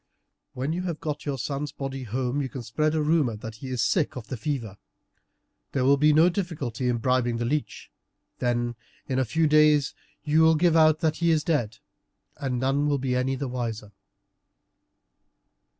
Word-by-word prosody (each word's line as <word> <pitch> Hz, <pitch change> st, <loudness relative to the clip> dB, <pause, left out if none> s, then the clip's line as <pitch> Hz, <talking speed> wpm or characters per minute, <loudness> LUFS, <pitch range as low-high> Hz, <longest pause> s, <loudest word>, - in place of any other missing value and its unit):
When 135 Hz, +5 st, -2 dB
you 180 Hz, -, -2 dB
have 170 Hz, -4 st, -3 dB
got 150 Hz, -2 st, -5 dB
your 140 Hz, -2 st, -1 dB
son's 140 Hz, +3 st, -3 dB
body 135 Hz, -2 st, -5 dB
home 125 Hz, +4 st, -1 dB
you 135 Hz, -, -3 dB
can 125 Hz, -1 st, -7 dB
spread 155 Hz, +8 st, 0 dB
a 155 Hz, -, +1 dB
rumour 150 Hz, -7 st, +2 dB
that 110 Hz, +1 st, -8 dB
he 130 Hz, -, -8 dB
is 125 Hz, -2 st, -1 dB
sick 165 Hz, -6 st, +1 dB
of 120 Hz, -4 st, -8 dB
the 130 Hz, -, -3 dB
fever. 115 Hz, -5 st, -4 dB, 1.0 s
There 130 Hz, -2 st, +1 dB
will 140 Hz, +1 st, +6 dB
be 150 Hz, +2 st, +4 dB
no 155 Hz, +3 st, +5 dB
difficulty 150 Hz, -, -2 dB
in 120 Hz, -, +1 dB
bribing 120 Hz, 0 st, +1 dB
the 120 Hz, -, -2 dB
leech. 145 Hz, +4 st, -3 dB, 0.5 s
Then 120 Hz, -1 st, 0 dB, 0.3 s
in 130 Hz, -1 st, 0 dB
a 130 Hz, -, +2 dB
few 160 Hz, +7 st, +1 dB
days 150 Hz, -2 st, +4 dB, 0.3 s
you 155 Hz, +1 st, +3 dB
will 160 Hz, 0 st, +6 dB
give 170 Hz, +1 st, +3 dB
out 155 Hz, -1 st, +5 dB
that 160 Hz, -1 st, +1 dB
he 170 Hz, -1 st, +1 dB
is 155 Hz, -2 st, +2 dB
dead, 120 Hz, -, -1 dB, 0.6 s
and 130 Hz, -3 st, -2 dB
none 135 Hz, +3 st, +1 dB
will 145 Hz, -1 st, +2 dB
be 130 Hz, -1 st, -1 dB
any 130 Hz, +1 st, 0 dB
the 140 Hz, +1 st, -3 dB
wiser." 115 Hz, -4 st, -4 dB
135 Hz, 185 wpm, -26 LUFS, 125-155 Hz, 1.0 s, will